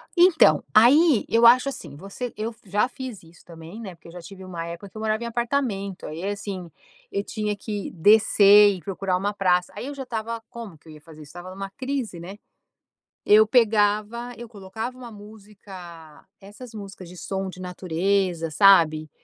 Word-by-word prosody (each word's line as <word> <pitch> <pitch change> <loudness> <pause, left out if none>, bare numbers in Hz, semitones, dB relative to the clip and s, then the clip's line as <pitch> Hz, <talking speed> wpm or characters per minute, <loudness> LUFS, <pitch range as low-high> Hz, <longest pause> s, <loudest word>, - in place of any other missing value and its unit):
Então, 350 -1 +5
aí 265 +4 +5
eu 230 +1 +3
acho 255 +3 +5
assim, 155 - -9
você 200 - -7
eu 220 +2 -4
já 205 +3 0
fiz 255 -5 -9
isso 165 +1 -19
também, 165 +4 -12
né, 190 -5 -8
porque 170 - -18
eu - - -12
já 175 +1 -10
tive 190 +3 -12
uma 175 -3 -6
época 170 +4 -8
que 195 - -22
eu 215 - -7
morava 220 +1 -1
em - - -4
apartamento, 235 -5 -3
aí 160 +3 -7
assim, 200 -3 -5 0.4
eu 200 - -2
tinha 210 -1 -3
que 205 0 -6
descer 205 +2 +5
e - - -9
procurar 185 +2 -2
uma 200 +3 -2
praça, 180 -3 +1
aí 210 - -6
eu 285 - -7
já 275 - -6
estava 230 -2 -5
como 225 -9 -10
que 160 - -25
eu 155 - -12
ia 150 - -14
fazer 155 -1 -15
isso? 145 - -16
Estava 175 +4 -10
em - - -11
uma 195 0 -6
crise, 255 -6 -4
né. 185 +4 -9 0.9
Eu 215 +1 +7
pegava, 220 +1 +1
eu 240 0 -10
colocava 220 +4 -7
uma 250 -2 -10
música, 195 -6 -13 0.2
essas 215 +5 -12
músicas 195 -3 -10
de 180 - -13
som 195 +1 -4
de 185 0 -10
natureza, 180 -1 -1
sabe, 155 -3 +4
200 Hz, 190 wpm, -24 LUFS, 180-225 Hz, 0.9 s, Eu